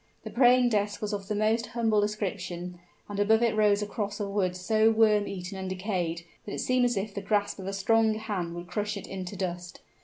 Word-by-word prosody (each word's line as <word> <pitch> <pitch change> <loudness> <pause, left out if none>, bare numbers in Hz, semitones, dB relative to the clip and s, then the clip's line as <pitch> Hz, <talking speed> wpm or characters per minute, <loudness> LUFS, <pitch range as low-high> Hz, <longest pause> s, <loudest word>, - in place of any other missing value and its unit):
The - - -7
praying 250 0 +5
desk 205 -2 0
was 210 0 -3
of 200 -1 -4
the 210 - -1
most 220 +3 +1
humble 220 -3 +3
description; 180 -4 -3 0.3
and 205 -1 -5
above 220 +3 +4
it 230 -2 +2
rose 210 -1 +3
a - - -2
cross 205 0 -4
of 205 -1 -2
wood 185 -3 0
so 215 +4 +3
worm 215 -2 +4
eaten 190 0 -6
and 190 0 -4
decayed 180 -3 -2 0.2
that 205 - -6
it - - -4
seemed 255 -1 +2
as 240 -3 +1
if 200 +1 -3
the 200 - -4
grasp 205 0 0
of 190 - -6
a - - -1
strong 220 +2 +3
hand 195 -6 -3
would 175 0 -6
crush 205 +3 -3
it 200 - -7
into 190 0 -6
dust. 175 -2 -4
205 Hz, 225 wpm, -28 LUFS, 190-215 Hz, 0.3 s, praying